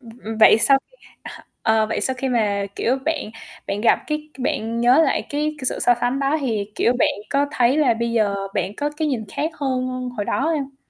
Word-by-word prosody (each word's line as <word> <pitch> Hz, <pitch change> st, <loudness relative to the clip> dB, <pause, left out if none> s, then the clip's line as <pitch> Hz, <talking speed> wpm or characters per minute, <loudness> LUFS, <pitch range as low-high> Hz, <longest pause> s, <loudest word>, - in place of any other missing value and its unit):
Ừm, 235 Hz, -3 st, -13 dB
ừm, 220 Hz, 0 st, -5 dB
vậy 220 Hz, 0 st, +7 dB
sau 270 Hz, +3 st, +5 dB
khi -, -, -25 dB, 0.3 s
à, -, -, -10 dB, 0.2 s
ờ, 220 Hz, -1 st, +2 dB
vậy 225 Hz, -, -2 dB
sau 260 Hz, -, +1 dB
khi 265 Hz, +1 st, -2 dB
mà, 205 Hz, -5 st, 0 dB
kiểu, 250 Hz, +3 st, +1 dB
bạn 320 Hz, -8 st, -2 dB, 0.4 s
bạn 200 Hz, +1 st, -3 dB
gặp, 230 Hz, -, +4 dB
cái, 305 Hz, 0 st, -4 dB
bạn 230 Hz, -2 st, -2 dB
nhớ 250 Hz, +6 st, +5 dB
lại -, -, -1 dB
cái 300 Hz, +1 st, -2 dB
c 255 Hz, -, +1 dB
sự -, -, -4 dB
so 245 Hz, -, +4 dB
sánh 245 Hz, +3 st, 0 dB
đó 280 Hz, +2 st, +1 dB
thì, 215 Hz, -6 st, -2 dB
kiểu, 240 Hz, -, +2 dB
bạn -, -, +4 dB, 0.2 s
có 285 Hz, 0 st, +2 dB
thấy 250 Hz, 0 st, +2 dB
là 280 Hz, -6 st, +3 dB
bây 235 Hz, +1 st, -2 dB
giờ 215 Hz, -3 st, +1 dB, 0.2 s
bạn 195 Hz, 0 st, -2 dB
có 290 Hz, 0 st, -1 dB
cái 310 Hz, 0 st, -1 dB
nhìn 245 Hz, -6 st, -2 dB
khác 310 Hz, +3 st, -1 dB
hơn 255 Hz, -2 st, -2 dB
hồi 205 Hz, -, -2 dB
đó -, -, -1 dB
hông? 285 Hz, -2 st, -1 dB
255 Hz, 230 wpm, -21 LUFS, 225-285 Hz, 0.4 s, vậy